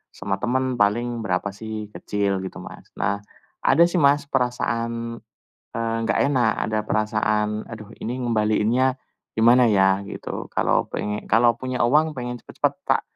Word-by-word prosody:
sama 95 0 -3
temen 130 0 -1
paling 120 +4 +1
berapa 100 -2 -1
sih, 110 0 -7
kecil 100 -2 -1
gitu 95 0 -6
Mas. - - -11
Nah, 100 +1 -1 0.4
ada 145 +6 +5
sih 175 +1 +2
Mas, 145 -1 +4
perasaan 115 -2 -1 0.5
eee, 115 0 -1
enggak - - +1
enak, 130 -6 +3 0.2
ada 110 - 0
perasaan, 105 0 0
"aduh 110 -2 -9
ini 125 +3 -4
ngembaliinnya 115 +2 +2 0.4
gimana 120 +3 +5
ya," 95 -2 +3
gitu. 100 - -6
Kalau - - +2
pengen 105 0 -4
kalau 115 0 +4
punya 130 0 -3
uang 150 +6 +3
pengen 125 -2 -5
cepet-cepet - - -2
tak - - +2
115 Hz, 145 wpm, -23 LUFS, 105-125 Hz, 0.5 s, ada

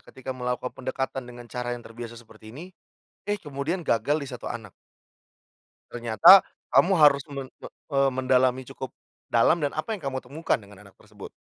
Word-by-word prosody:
ketika 130 0 -8
melakukan 125 0 -3
pendekatan 135 +1 -4
dengan 120 -1 -11
cara 120 0 -4
yang 120 - -13
terbiasa 115 0 -9
seperti 110 -2 -15
ini, 145 +9 -9 0.6
eh, 205 - +1
kemudian 150 +5 -3
gagal 145 +4 +1
di 140 - -6
1 125 -3 -8
anak. 110 -5 -7 1.2
Ternyata 120 - +7 0.3
kamu 195 - +5
harus 145 -2 +6
men 135 -2 -5 0.2
me - - -7 0.3
eee, 135 0 +4
mendalami 130 0 +2
cukup, 130 - -6 0.4
dalam 120 +8 +3
dan 145 -2 -2
apa 155 +8 -4
yang 195 - -9
kamu 130 -1 -2
temukan 155 -2 -1
dengan 105 -1 -15
anak 100 - -18
tersebut? 105 -1 -12
130 Hz, 170 wpm, -26 LUFS, 120-140 Hz, 1.2 s, Ternyata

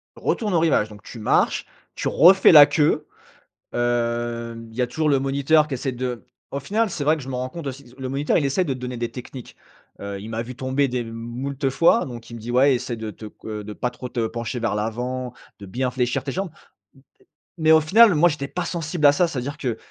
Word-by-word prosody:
Retourne 210 -5 -1
au 170 - +4
rivage 145 -10 +2
donc 105 -1 -13
tu 120 - -10
marches, 105 - +1 0.3
tu - - -3
refais 185 +5 +6
la 150 -3 +10
queue, 150 +1 +1 0.7
hem, 120 -1 -2
il - - -15
y - - +1
a 125 - +1
toujours 155 +5 -1
le 140 -2 +3
moniteur 140 +3 +2
qui 145 - -5
essaie 130 +1 -2
de 125 -1 -4 0.3
au 140 - -3
final, 215 +9 0
c'est 155 -5 -4
vrai 155 +2 +3
que - - -8
je - - -11
me 130 - -4
rends 125 +1 -3
compte 165 0 -7
aussi 135 +1 -6
disons, 125 0 -19
le 130 - -4
moniteur, 140 +3 +1
il 150 - +1
essaie 140 +7 +1
de 145 -6 -2
te 130 - -9
donner 125 0 -5
des 120 0 -3
techniques, 125 0 -10 0.4
heu, 100 0 -6
il 110 - -8
m'a 115 0 -3
vu 125 +1 -9
tomber 130 +2 0
des 125 -1 -2
m 115 -1 -7
moult 130 +5 -4
fois, 165 - +3
donc 120 -3 -9
il 115 - -8
me - - -8
dit: 115 +2 -6
«Ouais 130 +2 +4
essaie 125 0 -4
de 110 -1 -6
te 110 - -11
c 105 - -9
heu, 105 -1 -5
de 105 +1 -7
pas 125 - -2
trop 125 +1 -8
te 120 -2 -1
pencher 115 +2 -4
vers 115 -2 -1
l'avant, 125 +4 -3 0.3
de 100 - -9
bien 125 +6 -2
fléchir 125 0 -1
tes - - -4
jambes». 190 0 -3 1.1
M 160 - -3
et - - +6
mais - - +8
au 160 0 +7
final, 205 +5 +6
moi 170 +3 +5
j'étais 145 -3 -4
pas 180 +4 -4
sensible 165 -2 -2
à 145 - +9
ça, 170 +5 +2
c'est-à-dire 140 -1 -4
que, 125 -6 -3
130 Hz, 255 wpm, -23 LUFS, 120-150 Hz, 1.1 s, la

